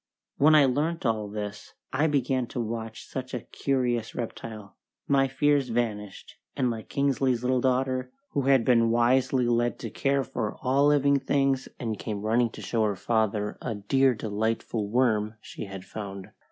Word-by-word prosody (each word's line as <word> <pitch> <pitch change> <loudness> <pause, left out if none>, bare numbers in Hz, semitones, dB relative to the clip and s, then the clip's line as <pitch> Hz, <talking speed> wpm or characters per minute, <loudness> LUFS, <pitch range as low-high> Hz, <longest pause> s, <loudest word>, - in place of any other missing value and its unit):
When 155 +2 +6
I 150 -2 +7
learnt 150 +5 0
all 110 -3 0
this, 105 -1 -6 0.2
I 145 +4 +2
began 135 -4 0
to 125 - -5
watch 115 -1 -4
such 130 0 -5
a 120 - -3
curious 125 -4 -1
reptile; 110 -3 -7 0.3
my 135 -1 +3
fears 140 0 +2
vanished, 105 -4 -3 0.2
and 130 -3 +1
like 110 -1 -7
Kingsley's 135 -3 +1
little 125 0 +2
daughter, 130 - 0 0.2
who 140 -2 -1
had 135 -4 +4
been 115 -2 +4
wisely 125 +2 +3
led 120 0 +1
to - - -6
care 140 -1 +1
for 110 -3 -3
all 135 +3 +3
living 140 -1 +4
things 135 -1 +1
and 110 -4 -3
came 105 -2 -4
running 115 +2 +2
to - - -9
show 115 -2 0
her 105 -2 0
father 105 -1 0
a 115 -3 -3
"dear 130 +6 +2
delightful 110 0 -2
worm" 110 -3 +1
she - - -8
had 95 -1 -8
found! 100 -2 -7
120 Hz, 165 wpm, -27 LUFS, 110-135 Hz, 0.3 s, I